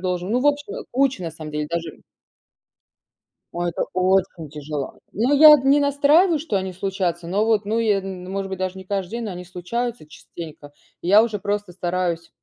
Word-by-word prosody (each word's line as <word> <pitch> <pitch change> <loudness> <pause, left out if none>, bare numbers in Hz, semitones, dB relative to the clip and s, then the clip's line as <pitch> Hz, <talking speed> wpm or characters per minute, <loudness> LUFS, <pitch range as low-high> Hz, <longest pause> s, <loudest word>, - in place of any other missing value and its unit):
должен. 180 0 -2
Ну, 240 - +2
в 280 - +1
общем, 290 +6 0
э, - - -6
куча, 260 -5 +1
на 165 - -3
самом 155 -1 -9
деле 150 0 -3
даже. 170 0 -4 1.5
Ой, 175 0 -1
это 170 - -2
очень 185 -3 +1
тяжело. 150 -1 -6
Ну, 245 +7 +1
я 300 0 +10
д 270 0 -1
не 280 +1 +6
настраиваю, 290 +5 +4
что 295 -8 -2
они 190 -1 -2
случатся, 180 -2 -2
но 200 +4 +1
вот 220 -2 +1
ну, 220 +2 0
е 215 -3 +2
н 185 -1 -7
может 195 0 -3
быть, 190 -1 -5
даже 185 0 -3
не 190 - -10
каждый 190 -1 -3
день, 235 0 -4
но 210 - -4
они 180 0 -8
случаются 205 +4 -4
частенько. 155 -2 -10 0.3
И 170 - -4
я 205 +3 +7
уже 225 -2 -2
просто 205 -1 -3
стараюсь 175 -1 -2
190 Hz, 205 wpm, -22 LUFS, 175-235 Hz, 1.5 s, я